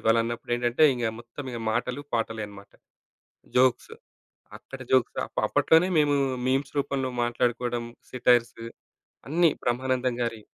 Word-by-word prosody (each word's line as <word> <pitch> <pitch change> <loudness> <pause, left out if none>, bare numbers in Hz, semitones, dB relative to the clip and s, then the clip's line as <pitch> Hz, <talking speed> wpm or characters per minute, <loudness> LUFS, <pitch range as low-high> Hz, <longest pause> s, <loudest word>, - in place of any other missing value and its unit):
ఇవాళన్నప్పుడేంటంటే, 120 +4 +1
ఇంగా 120 -2 -1
మొత్తం 120 +4 -9
ఇగ 115 - -5
మాటలు, 125 +5 -2
పాటలే 115 -1 -2
అనమాట. 100 0 -14 0.9
జోక్స్. 125 -1 +3 0.7
అక్కడ 135 - -11
జోక్స్ 130 -2 +3
అప్ - - -3
అప్పట్లోనే 160 +2 +4
మేమూ 145 -1 +3 0.3
మీమ్స్ 135 +1 0
రూపంలో 135 -2 -1
మాట్లాడుకోడం, 120 0 -1 0.3
సేటైర్స్ 120 -2 +2 0.7
అన్నీ 165 0 +4
బ్రహ్మానందం 125 0 0
గారియ్యి. 115 -2 -4
120 Hz, 115 wpm, -26 LUFS, 115-130 Hz, 0.9 s, అప్పట్లోనే